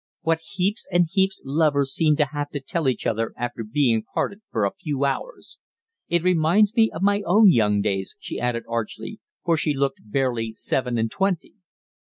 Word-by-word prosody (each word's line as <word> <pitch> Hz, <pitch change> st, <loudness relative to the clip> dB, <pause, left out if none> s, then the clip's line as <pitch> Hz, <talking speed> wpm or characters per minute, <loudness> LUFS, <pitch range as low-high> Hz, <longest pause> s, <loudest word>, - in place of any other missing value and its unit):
"What 165 Hz, -1 st, +1 dB
heaps 195 Hz, +4 st, -1 dB
and 175 Hz, 0 st, +4 dB
heaps 190 Hz, -1 st, +1 dB
lovers 140 Hz, -1 st, +1 dB
seem 155 Hz, -2 st, +3 dB
to 150 Hz, -, +3 dB
have 145 Hz, 0 st, -4 dB
to 145 Hz, -, -2 dB
tell 140 Hz, +1 st, -1 dB
each 125 Hz, -, -3 dB
other 115 Hz, +1 st, -1 dB
after 120 Hz, -1 st, -4 dB
being 115 Hz, 0 st, +1 dB
parted 200 Hz, -, -3 dB
for 110 Hz, -, 0 dB
a 100 Hz, -, -1 dB
few 140 Hz, -2 st, -2 dB
hours. -, -, -4 dB, 0.5 s
It 170 Hz, -1 st, +1 dB
reminds 185 Hz, +4 st, +3 dB
me 225 Hz, -2 st, +5 dB
of 160 Hz, -, -5 dB
my 205 Hz, +1 st, +3 dB
own 200 Hz, +3 st, +6 dB
young 105 Hz, -6 st, +2 dB
days," 95 Hz, -2 st, -2 dB
she -, -, -5 dB
added 120 Hz, -1 st, -1 dB
archly, 115 Hz, -2 st, -4 dB, 0.3 s
for 170 Hz, -, +3 dB
she 150 Hz, -1 st, 0 dB
looked 135 Hz, 0 st, -1 dB
barely 115 Hz, 0 st, -1 dB
seven 125 Hz, +2 st, -1 dB
and 110 Hz, -1 st, 0 dB
twenty. 190 Hz, -3 st, -1 dB
"Mr. 210 Hz, -, -41 dB
145 Hz, 190 wpm, -23 LUFS, 115-175 Hz, 0.5 s, own